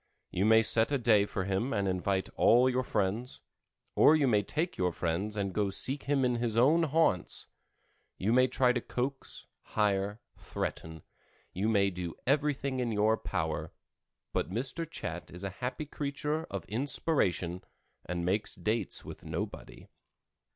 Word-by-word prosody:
You 95 - 0
may 110 +1 +6
set 110 +3 +3
a 140 - +2
day 110 -5 +4
for 95 - -3
him 100 +7 -1
and 100 -2 0
invite 95 +1 0
all 120 +3 +5
your 130 0 +1
friends, 110 +1 -2 0.5
or 155 - +6
you 145 -3 +3
may 105 -4 +3
take 160 - -2
your 90 -1 0
friends 90 +6 -2
and 100 -2 -2
go 105 0 +1
seek 135 +8 -1
him 140 -2 +2
in 125 -1 +1
his 115 -2 -1
own 150 +8 +5
haunts; 155 - +1 0.7
you 105 +5 +1
may 130 +1 +5
try 125 -1 +2
to 120 - -1
coax, 135 +4 -4 0.2
hire, 100 0 0 0.2
threaten; 80 -1 -5 0.5
you 100 +5 0
may 100 -3 +3
do 90 -2 -5
everything 140 -1 0
in 120 -2 -1
your 110 +1 +3
power; 80 -7 -3 0.6
but - - -1
Mr. 135 - -2
Chat - - -6
is 90 +2 -8
a 100 - -3
happy 125 +4 -3
creature 150 +2 -3
of - - -6
inspiration, 105 - 0 0.4
and 85 0 -3
makes 100 +4 0
dates 110 -2 -1
with - - -9
nobody. - - -6
110 Hz, 160 wpm, -31 LUFS, 95-135 Hz, 0.7 s, may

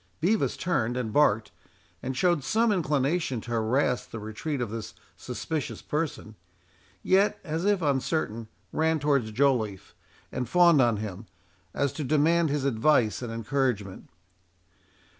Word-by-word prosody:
Bevis 205 +6 +1
turned, 125 -9 0
and 110 -4 -3
barked, 110 -7 +3 0.5
and 130 0 -4
showed 175 -4 +2
some 225 - +2
inclination 150 - 0
to 120 - -9
harass 120 +3 +1
the - - -9
retreat 115 +8 -4
of 120 -4 -3
this 115 -2 -6 0.2
suspicious 160 -3 -5
person, 150 -8 -3 0.7
yet, 195 +2 +3
as 165 +1 -3
if 205 -4 +2
uncertain, 135 -5 -1 0.3
ran 160 0 +2
towards 140 -6 +1
Joliffe, 110 -6 0 0.4
and 125 -2 -3
fawned 170 -2 +5
on 120 -4 +3
him, 105 0 -6 0.5
as 140 -2 0
to 155 - -4
demand 155 +4 +3
his 140 -1 -1
advice 120 -3 +2
and 120 -2 -5
encouragement. 115 -4 -2
135 Hz, 135 wpm, -27 LUFS, 115-160 Hz, 0.7 s, fawned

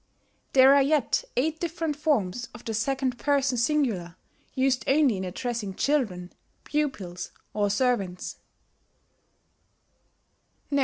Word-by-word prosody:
There 265 0 +8
are 280 - +6
yet 300 - +2
eight 315 +5 +1
different 330 -3 -2
forms 245 - 0
of 240 - -12
the 225 - -3
second 255 +2 -1
person 280 -2 +1
singular 235 - 0 0.4
used 260 -2 +2
only 275 -4 +4
in 190 - -4
addressing 205 +1 -4
children, 210 -12 0 0.3
pupils, 205 -13 -3 0.2
or 205 -1 +1
servants. 200 -5 -1
255 Hz, 105 wpm, -26 LUFS, 205-285 Hz, 0.4 s, There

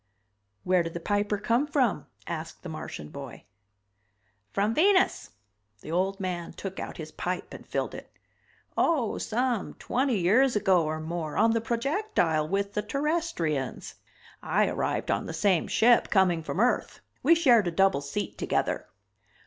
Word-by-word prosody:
"Where 180 -1 +3
did 165 0 -5
the - - -2
Piper 205 +3 0
come 235 +7 +1
from?" 255 - +1 0.2
asked 165 -1 -6
the 180 - -6
Martian 115 - -7
boy. - - -9 1.1
"From 205 +3 +1
Venus." 375 - +3 0.5
The 155 - -8
old 190 +3 0
man 180 -3 -4
took 195 -1 -6
out - - -6
his 155 -2 -7
pipe 180 +2 -4
and - - -11
filled - - -2
it. - - -9 0.7
"Oh, 275 -10 +1
some 240 -2 -1
twenty 260 -2 0
years 225 +9 +3
ago 190 -4 +3
or 155 +1 -2
more, 160 -1 -4
on 225 - +4
the 230 0 +1
projectile 235 - 0
with 200 +3 -1
the 210 - 0
Terrestrians. 275 - -2 0.5
I - - +2
arrived - - -1
on - - -1
the - - -5
same 175 +1 +2
ship, 235 +1 +4
coming 185 -4 +3
from 160 - -4
Earth, 245 +3 +1 0.2
we 335 +5 +5
shared 245 - +4
a - - 0
double 190 -3 +3
seat 145 +9 -4
together." - - -1
200 Hz, 155 wpm, -27 LUFS, 170-240 Hz, 1.1 s, we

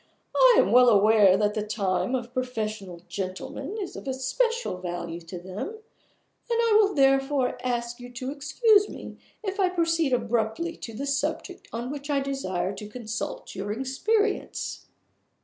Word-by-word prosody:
"I - - +7
am - - +4
well 250 0 +7
aware 205 -2 +6
that 210 0 +1
the 215 - -1
time 200 0 -1
of 245 -1 -5
professional 215 -8 -4
gentlemen 190 - -5
is 380 -4 -5
of - - -8
especial 265 - -1
value 175 -1 -5
to 170 +2 -8
them; 185 +3 -8
and 440 +2 -8 0.7
I 465 -2 +3
will 405 -1 +1
therefore 270 -1 +2
ask 240 -1 -2
you 245 0 -9
to 255 +2 -4
excuse 405 - +3
me - - -9 0.3
if 395 0 -3
I 375 -2 +4
proceed 330 -4 +1
abruptly 240 +7 0
to 225 - -8
the 275 - -4
subject 310 +6 -2
on 240 +3 -4
which 285 0 -7
I 285 -1 +2
desire 200 -10 -2
to 210 -1 -7
consult 230 0 -5
your 200 +1 -4
experience." 395 - -1
255 Hz, 155 wpm, -26 LUFS, 210-325 Hz, 0.7 s, I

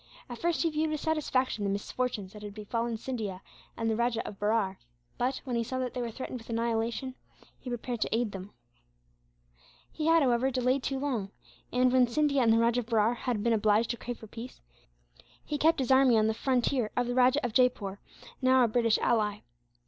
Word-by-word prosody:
At 240 - -7
first 345 0 0
he 330 - +1
viewed 310 +1 0
with 305 -1 -2
satisfaction 265 -8 0
the 200 - 0
misfortunes 205 0 -3
that 210 - -10
had 205 -1 -8
befallen 230 +2 -2
Scindia 215 -6 -4 0.4
and 225 - -1
the 220 - +1
Rajah 235 0 0
of 200 - -9
Berar 205 -2 +1 0.4
but, 255 +2 -1
when 255 -3 -3
he 235 - +1
saw 255 +3 -4
that 255 -1 -2
they 250 - -3
were 235 - -2
threatened 255 +2 -6
with 225 - -16
annihilation, 230 +2 -1 0.5
he 255 - -8
prepared 240 -1 -4
to - - +1
aid 230 -2 0
them. 195 +1 -8 1.4
He 310 0 -3
had, 330 -1 +5
however, 250 0 +2
delayed 255 +1 +1
too 270 +1 -2
long 255 -8 -2 0.4
and, 250 0 +3
when 255 -1 +5
Scindia 280 +2 +2
and 230 -2 +4
the 225 - +5
Rajah 235 +1 +3
of 235 - -5
Berar 225 -1 +2
had 240 -3 -2
been 235 0 +3
obliged 215 +1 +2
to 235 - -4
crave 245 0 -6
for - - -11
peace, 230 +4 -9 0.9
he 295 - -3
kept 320 +3 +4
his 265 -1 -1
army 260 -3 +6
on 215 - +3
the 220 - +2
frontier 250 -1 0
of 245 - +2
the 245 - -2
Rajah 255 +2 +3
of 235 - -3
Jaipore, 215 -6 +1 0.4
now 260 0 +5
a - - +4
British 230 0 +2
ally. 210 -2 +1
240 Hz, 210 wpm, -29 LUFS, 220-260 Hz, 1.4 s, army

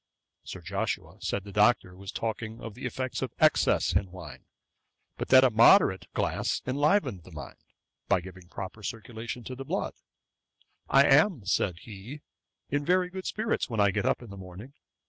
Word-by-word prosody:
Sir - - -8
Joshua - - -3
said 100 - -2
the 100 - -10
Doctor 105 -2 +3
was 95 +1 -8
talking 110 0 -4
of 115 - -7
the 125 +3 -5
effects 130 +1 -4
of - - -3
excess - - +3
in 95 +2 +1
wine; 90 -6 -11 0.7
but - - -4
that 130 0 +7
a 130 - +4
moderate 115 - +5
glass - - -1
enlivened 140 - +1
the 90 - -15
mind, 75 -3 -9 0.5
by - - +3
giving 90 0 -11
a 85 - -26
proper 95 +3 -7
circulation 115 +2 -6
to 130 - -7
the 135 +1 -7
blood. - - -2 1.0
'I 135 +1 +6
am 145 - +4
(said 90 -1 +1
he,) 115 +8 -10 0.5
in 145 +1 0
very 180 +3 +2
good 190 0 -6
spirits, 220 -7 -1
when 115 -3 -3
I 100 -1 +4
get 100 0 -1
up - - 0
in 115 - -11
the 100 - -9
morning. 95 +8 -10
115 Hz, 180 wpm, -28 LUFS, 95-135 Hz, 1.0 s, that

